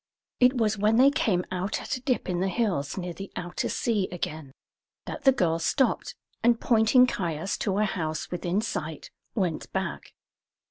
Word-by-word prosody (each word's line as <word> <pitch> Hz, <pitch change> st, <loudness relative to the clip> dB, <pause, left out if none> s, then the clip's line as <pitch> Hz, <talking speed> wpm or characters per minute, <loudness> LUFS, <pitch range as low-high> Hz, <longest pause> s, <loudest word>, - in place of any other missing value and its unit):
It 250 Hz, +1 st, +5 dB
was 215 Hz, -2 st, +1 dB
when 215 Hz, +2 st, +3 dB
they 270 Hz, +3 st, +7 dB
came 190 Hz, -, +1 dB
out 185 Hz, +3 st, -2 dB
at -, -, -3 dB
a 255 Hz, -, -7 dB
dip 255 Hz, -1 st, -1 dB
in 180 Hz, -1 st, -1 dB
the 190 Hz, -, +1 dB
hills 190 Hz, -10 st, -1 dB
near 180 Hz, -2 st, -4 dB
the 195 Hz, +4 st, -8 dB
outer 175 Hz, 0 st, -3 dB
sea 210 Hz, -5 st, 0 dB
again 160 Hz, -5 st, -5 dB, 0.5 s
that 295 Hz, -, -7 dB
the 270 Hz, -, +8 dB
girl 170 Hz, -10 st, +1 dB
stopped, 255 Hz, -, +1 dB, 0.3 s
and 235 Hz, 0 st, +4 dB
pointing 230 Hz, +2 st, +5 dB
Caius 175 Hz, -6 st, -2 dB
to 195 Hz, -1 st, 0 dB
a 210 Hz, -, +3 dB
house 155 Hz, -6 st, -3 dB
within 180 Hz, +3 st, -1 dB
sight, 160 Hz, -8 st, -5 dB, 0.2 s
went 180 Hz, -7 st, -1 dB
back. -, -, -4 dB
195 Hz, 175 wpm, -27 LUFS, 175-230 Hz, 0.5 s, the